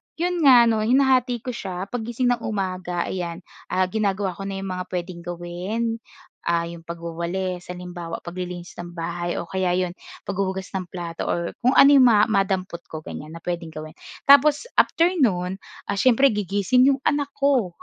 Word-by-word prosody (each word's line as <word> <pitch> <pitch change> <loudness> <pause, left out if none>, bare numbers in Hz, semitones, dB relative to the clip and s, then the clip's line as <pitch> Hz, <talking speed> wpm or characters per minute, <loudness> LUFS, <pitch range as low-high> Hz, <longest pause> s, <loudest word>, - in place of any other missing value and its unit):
'yon 350 +1 -1
nga 245 -3 +9
'no, 225 -2 +2
hinahati 250 0 +2
ko 250 - -3
siya, 190 -3 -5
paggising 245 +1 -1
ng 240 - 0
umaga 185 -4 -2
ayan, 175 -1 -4 0.2
ah, 185 - +1
ginagawa 195 0 0
ko 195 +3 -7
na 195 - -4
'yong 195 - -4
mga - - -2
puwedeng 180 -1 -5
gawin, 175 +7 -3 0.5
ah, 170 0 +2
'yong 170 0 -8
pagwawalis, 170 +2 -4
halimbawa 175 -2 -7
paglilinis 180 0 -7
ng 175 0 -7
bahay 175 +1 -3
o - - -2
kaya 185 -2 0
'yon, 180 -1 0 0.3
paghuhugas 190 -1 -3
ng 190 -2 -3
plato 170 -2 -5
or 170 0 -1
kung 255 +2 +2
ano 275 - +8
'yong 270 -3 +7
ma 210 -3 +5
madampot 190 -3 0
ko 155 -1 -7
ganyan, 155 +1 -8
na 165 - -9
puwedeng 170 -2 -4
gawin. 155 0 -7 0.3
Tapos 285 - +6 0.2
after 335 +2 +4
no'n, 190 -6 +1 0.3
ah, 200 - -1
siyempre 260 +3 +5
gigising 210 +6 +2
'yong 275 -1 +2
anak 290 -1 +1
ko. 260 -11 +1
190 Hz, 170 wpm, -23 LUFS, 175-235 Hz, 0.5 s, nga